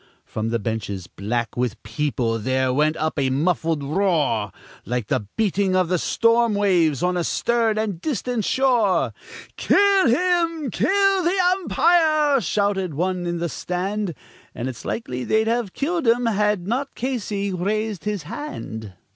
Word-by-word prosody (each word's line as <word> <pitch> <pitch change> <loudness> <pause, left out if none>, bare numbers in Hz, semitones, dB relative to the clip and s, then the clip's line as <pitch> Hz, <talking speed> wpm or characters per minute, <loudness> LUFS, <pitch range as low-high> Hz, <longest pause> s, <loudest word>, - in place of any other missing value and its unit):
From 110 +1 -3
the 115 - 0
benches, 100 -4 -4
black 115 +5 -3
with 120 -3 -2
people, 115 -1 -1
there 130 +3 0
went 150 +3 +2
up 155 -1 -1
a 135 -1 +1
muffled 160 +2 0
roar, 150 - 0 0.3
Like 125 -3 -3
the 105 - -1
beating 200 -3 +1
of 185 -2 +2
the 180 -1 +1
storm 230 +1 +2
waves 175 -8 +2
on 180 0 +1
a 175 - 0
stern 230 +3 +1
and 205 -6 -2
distant 245 -4 -2
shore; 240 -5 +2 0.4
"Kill 400 -4 +4
him! 330 0 +1
Kill 390 - +2
the 350 +3 +1
umpire!" 315 -5 +3
shouted 200 0 0
some - - -9
one 180 +1 -1
in 175 0 -2
the 170 +1 -1
stand. 185 +2 -3 0.4
And 120 - -3
it's 125 -4 -7
likely 125 - -3
they'd 220 - +2
have 230 -3 0
killed 325 -1 -1
him 235 +1 +3
had 210 -4 +1
not 265 +5 -2
Casey 210 -6 -2
raised 210 +2 -2
his 205 -6 -2
hand. 110 - -7
195 Hz, 155 wpm, -22 LUFS, 145-240 Hz, 0.4 s, Kill